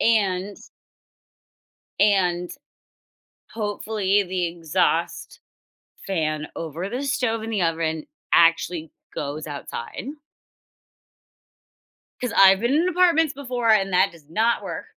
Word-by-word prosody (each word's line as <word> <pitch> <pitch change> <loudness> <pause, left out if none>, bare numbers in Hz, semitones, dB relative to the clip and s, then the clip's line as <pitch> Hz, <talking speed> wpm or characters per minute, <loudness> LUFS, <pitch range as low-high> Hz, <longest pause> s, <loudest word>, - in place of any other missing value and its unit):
And 200 -3 +1 1.4
And, 180 -4 +2 1.0
hopefully, 205 -2 0
the 180 -1 -2
exhaust 165 -2 -1 0.7
fan 155 -5 -1
over 165 +4 -5
the 250 +5 -3
stove 250 -5 -1
and 225 - -5
the 200 - 0
oven 160 -2 -1 0.3
actually 165 -1 +3 0.2
goes 150 +1 -4
outside. 140 - -7 2.2
'Cause 250 - -2
I've 195 0 +7
been 240 +4 +1
in 340 +4 +2
apartments 335 -4 +3
before, 250 -4 -1
and 195 -3 +3
that 190 +1 +3
does 160 -4 -18
not 225 +8 +1
work. - - -6
195 Hz, 105 wpm, -23 LUFS, 165-230 Hz, 2.2 s, I've